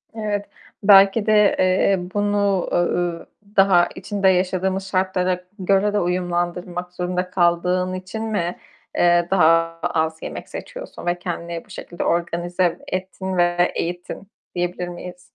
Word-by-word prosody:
Evet. 205 -2 -2 0.4
Belki 200 +1 +6
de, 210 -2 +4
eee, 185 +1 +3 0.2
bunu, 205 -2 +1
uuu, 175 -1 0 0.3
daha 185 -3 +5
içinde 195 +1 -1
yaşadığımız 190 +1 0
şartlara 185 -1 0 0.2
göre 195 +2 +2
de 210 - +2
uyumlandırmak 175 0 -2
zorunda 180 0 -2
kaldığın 180 +1 +1
için 185 +4 -5
mi, 185 -6 -2 0.4
eee, 175 0 +4
daha 165 -2 +3
az 160 0 0
yemek - - -7
seçiyorsun - - -8
ve 175 0 0
kendini 170 -2 -5
bu - - -27
şekilde 175 -2 -6
organize 175 +1 0
ettin 190 0 -4
ve 175 0 +2
eğittin, 175 +3 -4 0.3
diyebilir 175 0 -2
miyiz? 180 0 -9
180 Hz, 125 wpm, -21 LUFS, 175-195 Hz, 0.4 s, Belki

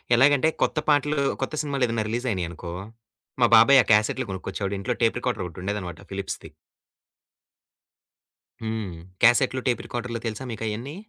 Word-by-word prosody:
ఎలాగంటే, 140 +4 +5
కొత్త - - +1
పాటలు 150 +1 +2 0.2
కొత్త 135 - -2
సినిమాలేదైనా 125 -7 0
రిలీజ్ 120 +3 -2
అయినాయనుకో, 85 -3 -4 0.7
మా 120 - +7
బాబాయ్ 130 +5 +8
ఆ - - -16
క్యాసెట్లు 105 +4 +3
కొనుకొచ్చేవాడు 95 +1 -4
ఇంట్లో 120 +6 -1
టేప్ 115 +1 +2
రికార్డరొకటుండేదనమాట 90 -5 -4
ఫిలిప్స్‌ది. 95 0 -5 2.1
హ్మ్ 110 -4 -3 0.3
క్యాసెట్లు, 125 +2 +5
టేప్ 120 -3 +1
రికార్డర్‌లు 120 -1 -4
తెలుసా! 115 +3 -4
మీకయన్ని? 115 +5 -4
115 Hz, 120 wpm, -25 LUFS, 100-130 Hz, 2.1 s, బాబాయ్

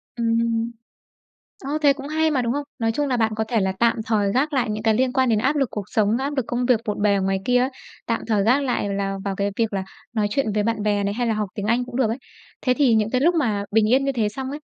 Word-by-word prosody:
Ừm, 230 0 0 0.9
ơ, 290 +3 -1
thế 285 -1 +6
cũng 275 +1 -8
hay 315 +1 +1
mà, 260 -4 +1
đúng 235 - 0
không? 290 +2 -2 0.2
Nói 225 -1 +1
chung 290 +4 -1
là 250 - +1
bạn 220 -2 +1
có 220 - 0
thể 230 -3 +1
là 190 0 0
tạm 235 +1 +3
thời 205 -3 +1
gác 290 +5 +1
lại 255 -6 0
những 215 0 -3
cái 220 -1 +3
liên 255 +2 +1
quan 260 -2 +2
đến 220 -2 +3
áp 265 +7 +1
lực 270 -4 +1
cuộc 205 -2 -4
sống, 215 -2 +2
áp 280 +2 -3
lực 260 - 0
công 245 +1 -1
việc 240 -3 +3
bộn 205 -1 -2
bề 205 -1 +4
ở 195 - +1
ngoài 195 0 0
kia 250 0 +3
á, 255 - +2 0.4
tạm 230 - 0
thời 210 -3 +1
gác 260 +5 +3
lại 245 -6 -1
là 195 0 -2
vào 195 -1 -2
cái 200 0 0
việc 225 -2 0
là 190 -1 -2 0.3
nói 215 -3 +1
chuyện 220 -2 0
với 210 - +2
bạn 225 -1 -1
bè 205 -1 +1
này 200 0 -1
hay 240 +2 -1
là 225 - +1
học 210 -2 -2
tiếng 205 - -4
Anh 235 +3 +1
cũng 245 - -8
được 255 -5 +2
ấy. 235 - -3 0.5
Thế 255 - +4
thì 255 -5 +3
những 220 0 +1
cái 255 - +1
lúc 340 +4 +3
mà 220 -10 0
bình 215 0 +3
yên 270 +1 +4
như 275 - 0
thế 225 -4 0
xong 260 +5 -5
á, 290 - -5
230 Hz, 300 wpm, -23 LUFS, 210-260 Hz, 0.9 s, thế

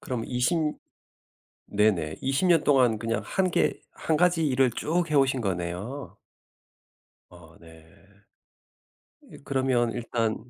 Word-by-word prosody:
그럼 125 -3 -4
20 125 +7 0 1.1
네네. 95 -7 +1
20 135 +7 0
년 165 -3 +4
동안 125 -6 +3
그냥 115 0 -2
1 185 -1 0
개 - - 0 0.2
1 160 - 0
가지 175 -1 +2
일을 130 -2 +2
쭉 170 +7 -1
해오신 135 -3 +2
거네요. 95 +7 -4 1.1
어 85 -2 -16
네. 80 -1 -16 1.5
이 - - -11
그러면 130 -4 0
일단 115 -1 -2
125 Hz, 165 characters per minute, -26 LUFS, 105-145 Hz, 1.5 s, 년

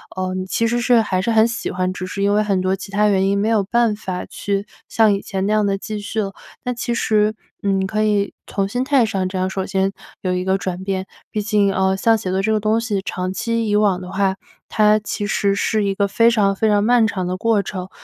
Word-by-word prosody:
呃， 185 0 -2
你 185 0 -3
其 230 +4 0
实 240 +1 +1
是 240 -1 +4
还 185 -4 -1
是 195 - -2
很 220 -1 +5
喜 235 0 -3
欢， 185 0 -1
只 185 0 -5
是 200 +2 -3
因 200 0 +3
为 210 - +3
很 200 -3 0
多 185 +1 +1
其 195 +1 -6
它 210 +1 +2
原 195 -2 +2
因 200 +1 +1
没 210 +2 +1
有 220 -3 +2
办 235 +1 +2
法 190 -3 -5
去 200 0 -3 0.2
像 220 -2 +3
以 200 - -2
前 190 -1 -3
那 205 - 0
样 215 -1 +2
地 195 0 0
继 210 +2 -5
续 215 +2 -3
了。 195 -2 -3 0.3
那 250 -1 -1
其 240 0 -3
实， 215 -1 +2 0.3
嗯， 195 -1 +1
可 215 +2 -1
以 205 -2 +1
从 195 - -1
心 245 +5 -2
态 270 -4 +3
上 195 -4 -1
这 185 +1 -4
样 185 0 0
首 190 0 -3
先 195 0 0 0.3
有 185 - -1
一 180 0 -2
个 190 0 +2
转 185 -1 -4
变。 190 -1 -2 0.3
毕 215 - -1
竟， 205 -2 +2
呃， 190 0 +1
像 225 +3 +3
写 195 -4 -4
作 190 +1 +1
这 220 +2 +1
个 215 - +1
东 215 +2 +2
西 215 -4 -2
长 185 -1 -3
期 230 +2 -1
以 205 - +1
往 205 -3 +3
的 180 -1 -8
话， 195 0 0 0.3
它 215 0 +4
其 210 0 -4
实 200 -1 +1
是 215 +1 0
一 200 -1 0
个 200 +1 +1
非 230 +4 +4
常 200 -4 +2
非 220 +3 +1
常 205 -1 +3
漫 235 +1 +4
长 185 -4 -3
的 180 - -2
过 220 +1 +2
程， 185 -1 -6
200 Hz, 280 characters per minute, -20 LUFS, 190-215 Hz, 0.3 s, 很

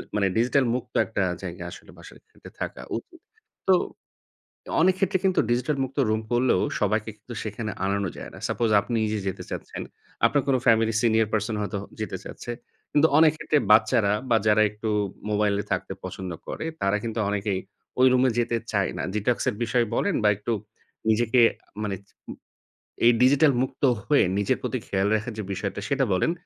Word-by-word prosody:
মানে 100 -2 +2
ডিজিটাল 125 +4 +3
মুক্ত 125 - -5
একটা - - -1 0.2
জায়গা - - -6
আসলে - - -12
বাসায় - - -14
থেকে - - -14
থাকা - - -4 0.2
উচিত। 345 - -11 0.5
তো 190 - +8 1.1
অনেক 185 +3 +5
ক্ষেত্রে 190 0 +1
কিন্তু 190 -1 +3
ডিজিটাল 125 +5 +1
মুক্ত 130 +2 -8
রুম 110 0 +1
করলেও 120 -5 +3 0.2
সবাইকে 110 +1 0
কিন্তু 115 +3 -10
সেখানে 110 0 -4 0.2
আনানো 100 0 0
যায় - - -8
না। - - -10
সাপোজ 115 - 0
আপনি 100 +4 -5
নিজে 105 0 -1
যেতে 95 - -5
চাচ্ছেন, - - -6 0.4
আপনার 145 - +2
কোনো 130 -1 +3
ফ্যামিলি 115 -1 +4
সিনিয়র 110 -2 +3
পারসন 110 +1 0
হয়তো 100 0 -3 0.2
যেতে 110 -3 -3
চাচ্ছে। - - -8 0.4
কিন্তু 150 +2 +5
অনেক 155 -1 +6
ক্ষেত্রে 150 - +2
বাচ্চারা 110 -1 +4 0.2
বা 115 - +5
যারা 105 0 +5
একটু 105 +1 -5 0.4
মোবাইলে 105 -1 +1
থাকতে - - -2
পছন্দ 95 0 -5 0.2
করে - - -5 0.2
তারা 100 +1 +2
কিন্তু 115 0 -3
অনেকেই 100 -2 -1 0.4
ওই 130 - +7
রুমে 130 0 +4
যেতে 120 0 +1 0.2
চায় 100 -3 +1
না। - - -2
ডিটক্স 105 +3 0
এর 125 - 0
বিষয়ে 120 +1 +1
বলেন 200 - +1
বা - - +6
একটু 110 +3 -2 0.6
নিজেকে 120 +2 +3 0.4
মানে 100 -2 -2
চ - - -27 1.0
এই 120 - +8
ডিজিটাল 140 +3 +5
মুক্ত 130 - -5 0.2
হয়ে 145 - +4
নিজের 100 - +1
প্রতি - - -2
খেয়াল 95 +1 +1
রাখার 110 +3 -2
যে - - -2
বিষয়টা 95 0 -3
সেটা 140 -1 +2
বলেন 90 - +2
110 Hz, 175 wpm, -25 LUFS, 105-130 Hz, 1.1 s, তো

